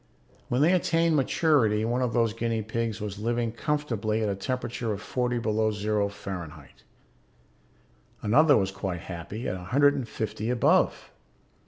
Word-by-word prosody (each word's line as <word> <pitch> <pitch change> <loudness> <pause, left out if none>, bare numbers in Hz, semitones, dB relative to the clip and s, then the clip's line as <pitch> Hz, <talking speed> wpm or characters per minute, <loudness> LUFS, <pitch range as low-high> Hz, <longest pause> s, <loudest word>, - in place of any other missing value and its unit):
When 125 +3 +1
they 170 +4 +5
attained 165 -2 +2
maturity 130 -7 +2
one 120 +2 0
of 125 -2 0
those 115 -2 +1
guinea 115 -1 -2
pigs 110 0 -3
was 105 -1 -5
living 115 +1 -1
comfortably 115 -5 -1
at 105 - 0
a - - 0
temperature 120 +1 -3
of 100 - -3
forty 125 +2 -1
below 110 -1 +1
zero 105 -1 0
Fahrenheit, 85 -7 -8 1.4
another 145 +7 +5
was 95 -1 0
quite 95 -3 -4
happy 90 +7 -6
at - - -1
a 90 -1 -7
hundred 145 +8 +4
and 130 -5 -4
fifty 110 0 -3
above. 125 -1 +2
115 Hz, 155 wpm, -27 LUFS, 105-125 Hz, 1.4 s, they